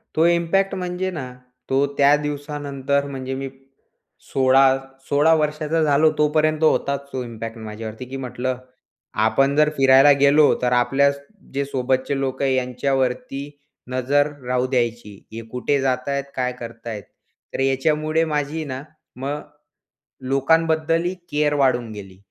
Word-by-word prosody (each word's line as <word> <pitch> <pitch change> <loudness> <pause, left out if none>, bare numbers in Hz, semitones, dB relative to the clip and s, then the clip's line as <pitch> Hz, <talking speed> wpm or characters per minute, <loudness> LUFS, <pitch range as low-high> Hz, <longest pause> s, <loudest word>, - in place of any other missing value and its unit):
तो 160 - +4
इम्पॅक्ट 175 +3 +2
म्हणजे 180 0 -3
ना 130 -7 -6 0.4
तो 135 +1 +3
त्या 140 +1 +6
दिवसानंतर, 145 -1 -2
म्हणजे 135 -1 -5
मी 135 0 -4 0.8
16-16 135 +3 +3
वर्षाचा 155 +1 0
झालो 150 +1 +4
तोपर्यंत 155 +1 +2
होताच 140 -2 +1
तो 130 - -2
इम्पॅक्ट 115 -1 -7
माझ्यावरती 110 +2 -7
की 130 +2 -7
म्हटलं 130 0 -3 0.7
आपण 135 +1 +2
जर 150 0 +4
फिरायला 135 +1 +7
गेलो 145 +2 +5
तर, 125 - +1
आपल्या 135 +3 +3 0.4
जे 140 0 -1
सोबतचे 130 +1 -1
लोक 130 0 -3
आहे 135 -1 +2
यांच्यावरती 130 +2 -1 0.4
नजर 140 +3 +2 0.2
राहू 125 0 +1
द्यायची, 120 -4 -2 0.2
हे 115 - -5
कुठे 130 +3 0
जात 130 -1 -1
आहेत, 140 0 -1
काय 125 -1 0
करत 115 0 -9
आहेत. 105 -3 -5 0.5
तर - - -4
याच्यामुळे 150 +4 +1
माझी 150 0 -2
ना 130 -2 -5 0.3
मग 140 +4 -4 0.9
लोकांबद्दलही 165 +4 +2 0.2
केअर 150 0 +1
वाढून 130 -5 +1
गेली. 95 -3 -10
135 Hz, 130 wpm, -22 LUFS, 130-150 Hz, 0.9 s, फिरायला